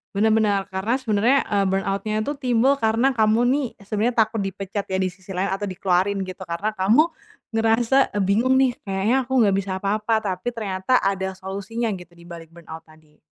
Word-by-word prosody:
Benar 215 +3 +3
benar, 215 -2 +2
karena 190 +4 -2
sebenarnya, 235 +3 +2
eee, 200 -1 +1
burnout-nya 195 +3 -1
itu 290 +6 -3
timbul 255 +1 +2
karena 225 +2 +2
kamu 220 0 +3
nih 275 0 +1
sebenernya 220 +4 0
takut 220 +1 0
dipecat 195 +1 -4
ya 190 0 -2
di 185 - +1
sisi 190 +1 -11
lain 185 +2 -1
atau 195 +2 -2
dikeluarin 190 +1 0
gitu, 185 -1 -7
karena 170 +5 -2
kamu 220 - +3 0.4
ngerasa, 225 +4 +2
"Eee, 205 - 0
bingung 215 +7 +2
nih 260 -2 +2
kayaknya 210 +7 0
aku 260 - -5
nggak 200 -3 +3
bisa 195 0 -3
apa-apa," 215 +2 0
tapi 195 +4 -3
ternyata 210 +2 0
ada 190 -1 -1
solusinya 200 +5 -4
gitu 175 -1 -14
di 170 0 -16
balik 165 -1 -10
burnout 165 -1 -11
tadi. 155 -1 -22
200 Hz, 185 wpm, -22 LUFS, 190-225 Hz, 0.4 s, Benar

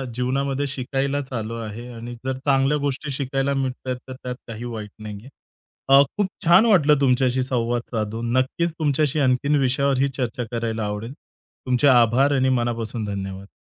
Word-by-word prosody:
जीवनामध्ये 135 +3 -1
शिकायलाच 135 +1 -2
आलो 115 0 -3
आहे 115 +2 -6
आणि 120 +1 -7
जर 130 -1 -1
चांगल्या 135 +1 +3
गोष्टी 140 0 -3
शिकायला 135 0 -1
मिळतायेत, 130 -1 -2
तर 130 - -6
त्यात 125 0 -4
काही 115 0 -7
वाईट 105 -2 -6
नाहीये. 105 +3 -8 0.6
अ, 135 +1 +8 0.2
खूप 205 -2 +2 0.2
छान 175 +6 +7
वाटलं 150 -10 +5
तुमच्याशी 130 -1 +2
संवाद 120 -2 -1
साधून. 110 +2 -2
नक्कीच 140 +6 +1
तुमच्याशी 150 -1 +1
आणखीन 140 +2 +2
विषयावरही 135 +1 +2
चर्चा 125 -1 -2
करायला 115 -2 -2
आवडेल. 105 +4 -4 0.5
तुमचे 125 +3 +3
आभार 125 +2 +5
आणि 130 0 +2
मनापासून 120 -3 -1
धन्यवाद. 100 -1 -5
130 Hz, 150 wpm, -23 LUFS, 115-140 Hz, 0.6 s, अ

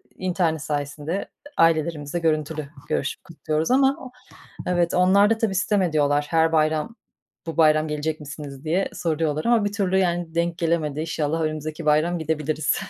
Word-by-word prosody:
internet 175 -4 0
sayesinde 145 +4 -3 0.3
ailelerimizle 160 -1 +1
görüntülü 155 -2 -1 0.2
görüşüp 140 - -2
kutluyoruz 160 +2 -2
ama 265 -1 +2 0.6
evet, 175 -1 +1
onlar 190 +3 +5
da 225 - +2
tabii 220 -4 -1
sitem 200 +1 +2
ediyorlar. 145 -4 +2
Her 160 0 +3
bayram, 155 +6 +1 0.5
"Bu 165 - -5
bayram 155 -1 +4
gelecek 150 +1 -2
misiniz?" 145 -2 -9
diye 170 +5 0
soruyorlar 155 -2 -1
ama 235 -3 +3
bir 205 - -1
türlü 190 -2 +1
yani 175 -3 0
denk 170 0 0
gelemedi. 160 -3 0
İnşallah 160 0 -1
önümüzdeki 155 0 -3
bayram 155 +3 +2
gidebiliriz. 155 -1 -1
160 Hz, 145 wpm, -23 LUFS, 155-175 Hz, 0.6 s, onlar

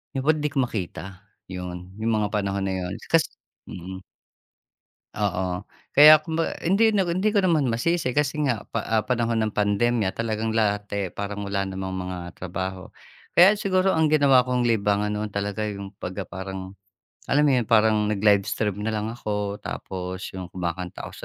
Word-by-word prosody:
Di 135 - 0
pod 155 +2 +3
di 150 - 0
ko 135 -2 +1
makita, 95 -4 -6 0.3
'yun, 90 0 -7
'yung 115 +1 0
mga 105 -1 0
panahon 100 -1 -1
na 95 - -1
'yun, 90 0 -4 0.2
kasi 165 -1 +4 0.4
mm. 95 +1 -8 1.1
Oo, 95 -2 -2 0.2
kaya 155 +1 +8
kumba 165 +1 -2
hindi 200 +6 +4
na, 195 - +3
hindi 185 +5 0
ko 200 - +4
naman 160 -7 +3
masisi 125 +3 0
kasi 150 0 +1
nga 120 -5 -1
pa - - -1
ah, 110 -1 +1
panahon 115 0 0
ng 110 - -1
pandemya, 105 0 +1
talagang 110 -1 -2
lahat, 105 -2 +1
eh, 100 -3 -2
parang 100 0 -5
wala 100 -1 -2
namang 95 0 -5 0.2
mga 90 -1 -6
trabaho. 95 +1 -5 0.5
Kaya 195 +4 +7
siguro 190 -1 +2
ang 160 -2 +3
ginawa 140 -4 +4
kong 125 -1 +1
libangan 105 -3 +1
noon 105 +1 -2
talaga 100 +1 -3
yung 100 -1 -6
pagka 95 +2 -4
parang 95 0 -7 0.5
alam 145 +2 +3
mo 145 - +4
'yun, 120 -3 0
parang 110 -2 +4
nag-live 100 -1 +3
stream 105 -2 -2
na 110 - -1
lang 105 0 -2
ako, 105 -3 -3
tapos 95 0 -5
yung 95 -1 -6
kumakanta 90 0 -4
ako - - -11
105 Hz, 170 wpm, -24 LUFS, 95-130 Hz, 1.1 s, kaya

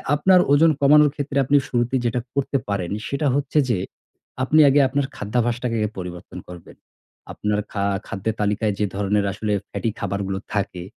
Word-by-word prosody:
আপনার 185 +5 +4
ওজন 160 +3 +5
কমানোর 150 +1 +6
ক্ষেত্রে 145 -1 -3
আপনি 145 +3 +4
শুরুতেই 120 +1 0
যেটা 120 +1 0
করতে 140 0 0
পারেন, 95 -4 -2 0.2
সেটা 140 +2 -1
হচ্ছে 145 +1 -1
যে 115 - +2 0.7
আপনি 150 +4 +3
আগে 140 +2 +4
আপনার 140 +2 -1
খাদ্যাভাসটাকে 120 +2 -1 0.2
পরিবর্তন 90 -1 -8
করবেন। 90 -2 -12 0.6
আপনার 105 0 -2
খা 100 - -2 0.2
খাদ্যের 100 +3 -3
তালিকায় 105 +1 0
যে 105 - +2
ধরনের 100 0 0
আসলে 105 +2 -2 0.2
ফ্যাটি 115 - -2
খাবারগুলো 100 -1 -3
থাকে 100 -4 -2
115 Hz, 155 wpm, -22 LUFS, 100-140 Hz, 0.7 s, কমানোর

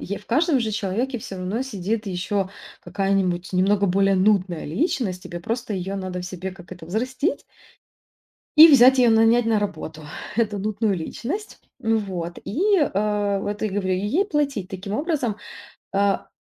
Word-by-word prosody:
Е 200 +2 -4
в - - -20
каждом 300 +4 +2
же 220 -2 -1
человеке 225 +5 -2
всё 195 - -7
равно 190 +7 -2
сидит 215 -2 -3
еще 190 +1 -2 0.3
какая-нибудь 195 -3 -1
немного 200 +2 +2
более 195 +1 +3
нудная 185 -3 +2
личность. 190 - -1
Тебе 175 - -7
просто 230 +4 -3
ее 190 +1 -3
надо 185 -2 -4
в 180 - -6
себе, 185 0 -5
как 180 -2 -12
это, 180 -2 -10
взрастить 255 - -2 1.1
и 315 +2 +11
взять 265 -2 +7
ее 245 -2 +5
нанять 225 +2 +4
на 225 -1 +3
работу, 195 -6 -5 0.3
эту 215 -3 0
нудную 210 +1 0
личность. 270 - -5 0.2
М, 225 -1 +2
вот. 175 -4 -5
И, 230 - -4 0.2
э, 205 - 0
вот 205 +2 -4
и 215 - +1
говорю, 190 -1 -1
и - - -1
ей 230 - +1
платить 285 - -1
таким 195 +1 -5
образом. 275 - -1 0.6
А, 200 0 +1
205 Hz, 165 wpm, -23 LUFS, 185-235 Hz, 1.1 s, и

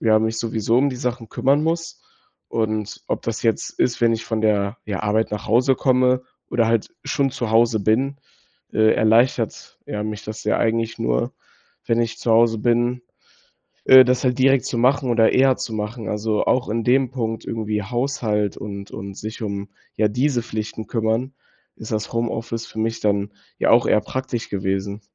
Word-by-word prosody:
ja 110 0 +4
sowieso 115 0 0
um 140 +2 +3
die 130 - -5
Sachen 125 -3 -3
kümmern 140 +6 +2
muss. 165 +1 -2 0.5
Und 110 -2 -2
ob - - -2
das - - -3
jetzt - - -1
ist, 120 - +1
wenn 115 -1 +4
ich 115 0 -5
von 110 -1 -2
der, 105 0 +1
ja, 100 -3 -3
Arbeit 105 +1 +1
nach 105 - -5
Hause 125 +4 +3
komme 130 -1 +2 0.3
oder 115 -2 +2
halt 115 -2 +1 0.2
schon 140 -1 0
zu 120 -3 -4
Hause 115 -1 +3
bin 130 +7 +1 0.6
äh, 110 0 +4
erleichtert 115 +1 +1
ja 105 -1 -3
mich 105 0 -5
das 110 0 -7
ja - - +2
eigentlich 115 0 0
nur, - - 0 0.5
wenn 115 0 +2
ich 115 0 -2
zu 120 - -1
Hause 115 0 +4
bin, 120 +2 +1 0.8
äh, 130 0 +9
das 125 +1 +1
halt 125 0 +1
direkt 135 0 +4
zu 120 - -2
machen 130 +1 +2
oder 115 -2 +4
eher 130 0 +4
zu 115 - -5
machen. 110 +2 -4
Also, 105 0 -1
auch 125 - +1
in 115 +2 -1
dem 130 +2 +3
Punkt, 115 -4 -3
irgendwie 105 -2 -2
Haushalt 115 -4 -1
und 100 -1 -7
und 100 0 -7
sich 110 +3 -7
um, 100 -1 -4 0.3
ja, 105 0 +3
diese 125 +3 0
Pflichten 110 -1 -5
kümmern, 115 +3 -1 0.4
ist 110 - -8
das 110 +1 -2
Homeoffice 115 0 -3
für - - -11
mich 115 +1 -1
dann 100 0 0 0.3
ja - - +2
auch - - +5
eher 105 - +4
praktisch 120 +1 -4
gewesen. 95 +1 -2
115 Hz, 180 wpm, -22 LUFS, 110-125 Hz, 0.8 s, äh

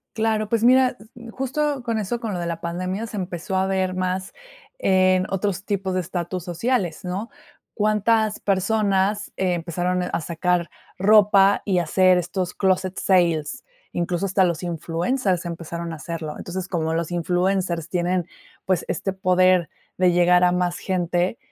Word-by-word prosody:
Claro, 220 -1 0
pues, 230 -1 +1
mira, 255 +1 +5
s 210 - -15
mm, 235 -1 -11
justo 270 +2 -2
con 230 -2 -1
eso, 225 +4 -2
con 225 -4 -4
lo 180 - -3
de 175 - -3
la 170 -1 -4
pandemia, 185 +5 -3
se 215 - -7
empezó 180 0 -4
a 190 0 +2
ver 190 -1 0
más 185 +1 -2 0.5
en 185 - +3
otros 195 0 -2
tipos 195 -3 -2
de 185 - +1
estatus 180 0 -4
sociales, 185 0 -1
¿no? 195 +6 -4 0.4
¿Cuántas 215 0 +1
personas 200 0 +1
empezaron 180 0 -1
a 175 -1 -2
sacar 170 +1 -1 0.3
ropa 200 0 +5
y 195 -3 0
a 175 - +2
hacer 185 +3 +4
estos 180 +1 -2
clóset 190 -1 0
sales? 170 -5 +1 0.3
Incluso 175 +2 -1
hasta 190 0 +2
los 170 -1 0
influencers 175 - -1
empezaron 170 0 -5
a - - -5
hacerlo. 160 0 -5
Entonces, 185 +1 -5
como 160 -2 -1
los 165 +1 -2
influencers 175 -1 0
tienen, 180 0 0 0.4
pues, 185 -3 0
este 195 - -2
poder 185 -2 +3 0.3
de 180 -1 +4
llegar 180 +1 +4
a 180 - +5
más 180 -1 0
gente, 180 +1 -1
185 Hz, 160 wpm, -23 LUFS, 175-200 Hz, 0.5 s, mira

